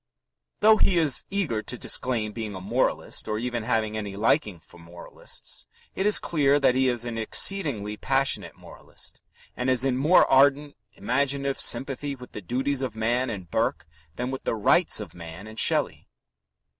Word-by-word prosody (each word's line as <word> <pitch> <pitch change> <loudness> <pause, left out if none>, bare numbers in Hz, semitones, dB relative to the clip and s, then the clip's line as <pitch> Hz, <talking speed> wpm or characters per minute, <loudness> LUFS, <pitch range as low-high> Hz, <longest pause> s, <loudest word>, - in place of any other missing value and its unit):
Though 215 +1 +6
he 185 -4 +2
is 155 -5 +3
eager 175 - -1
to 125 - -2
disclaim 115 -3 -2
being 110 -2 -6
a - - -6
moralist 110 +8 -1
or 105 0 -2
even 120 +1 -3
having 110 -1 -1
any 105 -2 -5
liking 105 -3 +1
for 85 +2 -18
moralists, 85 +1 -8 0.3
it 190 - 0
is 210 - +6
clear 145 -3 +2
that 135 -3 +3
he 130 +1 +2
is 120 -1 -1
an 115 -1 -4
exceedingly 110 - 0
passionate 135 +3 0
moralist - - -9 0.3
and 125 +1 -2
is 130 0 +3
in 130 -2 +1
more 155 +7 +5
ardent 140 +2 +3 0.2
imaginative 140 +6 -1
sympathy 140 +1 +1
with 125 -1 -13
the 105 - -7
duties 130 +7 -2
of 125 -5 -4
man 120 +3 0
and 95 -7 -7
Burke - - -1 0.3
than 125 +5 -3
with 135 - -6
the - - -1
rights 105 - +3
of - - -8
man 85 +3 -10
and 110 +1 -6
Shelley. - - +1
125 Hz, 170 wpm, -25 LUFS, 110-140 Hz, 0.3 s, Though